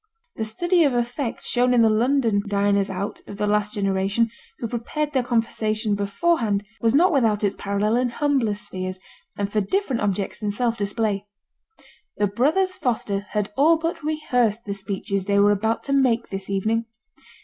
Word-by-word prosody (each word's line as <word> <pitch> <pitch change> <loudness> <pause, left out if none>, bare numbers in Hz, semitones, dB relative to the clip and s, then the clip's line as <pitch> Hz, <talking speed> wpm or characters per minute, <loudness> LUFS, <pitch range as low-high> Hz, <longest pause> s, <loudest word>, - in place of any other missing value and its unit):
The 220 - -2
study 345 +11 +2
of 275 -5 +2
effect 240 +1 -2
shown 250 0 +2
in 235 - +5
the 225 - +5
London 230 -2 +2
diners 200 -1 +1
out 195 +1 -4
of 200 - -8
the 210 - 0
last 210 +1 +1
generation, 195 +3 +1 0.3
who 230 - -3
prepared 290 +6 -3
their 260 - +3
conversation 225 -2 0
beforehand, 205 +1 0 0.2
was 230 +2 +3
not 355 +5 +5
without 225 -8 +2
its 200 - +2
parallel 205 +3 0
in 250 0 +1
humbler 265 -5 +1
spheres, 185 -2 -5 0.4
and 200 0 -2
for 215 - +1
different 265 - -1
objects 200 -1 -1
than 210 -1 -2
self 230 +3 0
display. 205 -1 -1 0.9
The 205 - +2
brothers 300 - +1
Foster 205 - -2
had 210 -1 -2
all 315 +4 +5
but 330 +1 -3
rehearsed 250 -8 0
the 200 - -3
speeches 195 -1 -3
they 200 0 +1
were 205 +1 +5
about 220 +3 0
to 275 - -2
make 250 -4 +2
this 195 0 -5
evening. 220 +4 0
220 Hz, 170 wpm, -23 LUFS, 200-250 Hz, 0.9 s, in